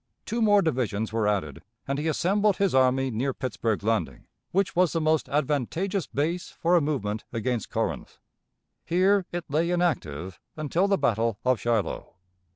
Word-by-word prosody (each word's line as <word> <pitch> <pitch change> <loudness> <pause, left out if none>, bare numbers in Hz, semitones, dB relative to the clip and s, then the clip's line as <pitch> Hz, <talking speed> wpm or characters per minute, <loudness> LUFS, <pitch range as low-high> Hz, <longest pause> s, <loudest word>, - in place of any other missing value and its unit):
Two 235 +1 -2
more 205 -2 +5
divisions 115 -8 -1
were 110 -2 +1
added, 85 -7 -1 0.3
and 140 +1 -1
he 155 - -2
assembled 195 +5 +2
his 195 -2 +1
army 130 0 +3
near 130 +4 -1
Pittsburg 115 -4 -2
Landing, 110 +1 -1 0.3
which 190 -3 0
was 180 -1 +3
the 165 - +1
most 155 -1 +1
advantageous 150 - -1
base 165 +6 -2
for 170 +2 +1
a 170 - +5
movement 110 -8 -2
against 120 0 -2
Corinth. - - -3 0.7
Here 185 +2 +2
it 175 -1 -4
lay 160 +4 0
inactive 95 - -1 0.2
until 160 +5 +1
the 200 -1 +2
battle 115 -4 +1
of 130 -2 +3
Shiloh. 115 -7 -2
145 Hz, 160 wpm, -26 LUFS, 115-175 Hz, 0.7 s, more